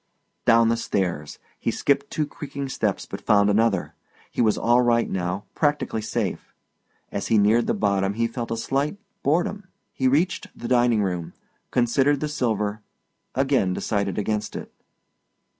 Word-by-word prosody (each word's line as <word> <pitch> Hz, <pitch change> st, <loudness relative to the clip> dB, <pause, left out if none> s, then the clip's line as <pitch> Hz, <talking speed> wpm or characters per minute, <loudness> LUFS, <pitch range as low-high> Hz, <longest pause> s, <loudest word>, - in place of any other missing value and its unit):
Down 115 Hz, -1 st, +5 dB
the 115 Hz, -, +2 dB
stairs. 90 Hz, -9 st, -2 dB, 0.2 s
He -, -, -1 dB
skipped -, -, +1 dB
two 155 Hz, -, -1 dB
crumbing 140 Hz, -2 st, -6 dB
steps -, -, -1 dB
but -, -, -7 dB
found 100 Hz, -1 st, +4 dB
another. 105 Hz, -3 st, +1 dB, 0.4 s
He -, -, -1 dB
was 110 Hz, -2 st, +3 dB
all 120 Hz, +1 st, +4 dB
right 120 Hz, -1 st, +3 dB
now, 90 Hz, +2 st, -2 dB
practically 145 Hz, -7 st, 0 dB
safe; 110 Hz, -, -3 dB, 0.6 s
as 100 Hz, -, -3 dB
he 115 Hz, -, +3 dB
neared 105 Hz, +3 st, +4 dB
the -, -, +1 dB
bottom 100 Hz, -1 st, +1 dB
he 115 Hz, +1 st, +1 dB
felt 115 Hz, 0 st, -4 dB
a 115 Hz, -, -2 dB
slight 140 Hz, -, -1 dB, 0.2 s
boredom. 180 Hz, +7 st, 0 dB, 0.3 s
He 130 Hz, -, +1 dB
reached 160 Hz, +8 st, +1 dB
the 120 Hz, -, -5 dB
dining 120 Hz, -3 st, +3 dB
room 90 Hz, -3 st, -3 dB, 0.4 s
considered 130 Hz, +4 st, +2 dB
the 150 Hz, -, -2 dB
silver 110 Hz, -7 st, -1 dB, 0.5 s
again 135 Hz, -8 st, +2 dB
decided 100 Hz, -2 st, -1 dB
against 105 Hz, 0 st, -2 dB
it. -, -, -7 dB
115 Hz, 155 wpm, -24 LUFS, 100-135 Hz, 0.6 s, Down